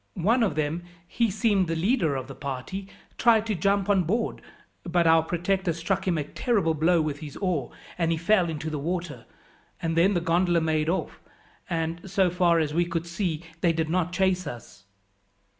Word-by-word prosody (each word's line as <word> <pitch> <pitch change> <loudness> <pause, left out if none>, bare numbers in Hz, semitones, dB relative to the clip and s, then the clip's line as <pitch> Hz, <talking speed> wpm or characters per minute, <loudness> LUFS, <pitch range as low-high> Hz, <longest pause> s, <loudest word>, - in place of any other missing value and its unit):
One 215 +7 +2
of 200 -10 +1
them 155 +2 -1 0.3
he 230 +4 +1
seemed 200 -2 +1
the 165 - -1
leader 170 - +1
of 130 -1 -3
the 135 - -9
party 140 +10 -5 0.3
tried 225 -2 +4
to 220 - -1
jump 200 +2 +1
on 200 -2 +4
board, 220 +8 -1 0.4
but 175 -1 +1
our 165 0 +6
protector 175 +2 -1
struck 175 +4 -2
him 175 -3 +2
a 150 - 0
terrible 180 - 0
blow 165 +2 +3
with 150 -2 -3
his 150 -3 -8
oar, 175 -10 -1 0.3
and 165 -1 +2
he 165 - +1
fell 175 +1 +2
into 160 0 -4
the 150 - -3
water, 170 +1 -4 0.5
and 165 0 -2
then 185 +4 +4
the - - +3
gondola 170 +1 +2
made 155 -1 0
off, 185 - -2 0.5
and, 170 +2 -3
so 190 -2 +2
far 175 -1 +3
as 155 -2 0
we 175 +2 +2
could 170 -1 -3
see, 170 -2 -3 0.2
they 170 -1 +2
did 160 -1 -1
not 180 -1 0
chase 185 0 +1
us." 115 -4 -9
170 Hz, 190 wpm, -26 LUFS, 160-190 Hz, 0.5 s, our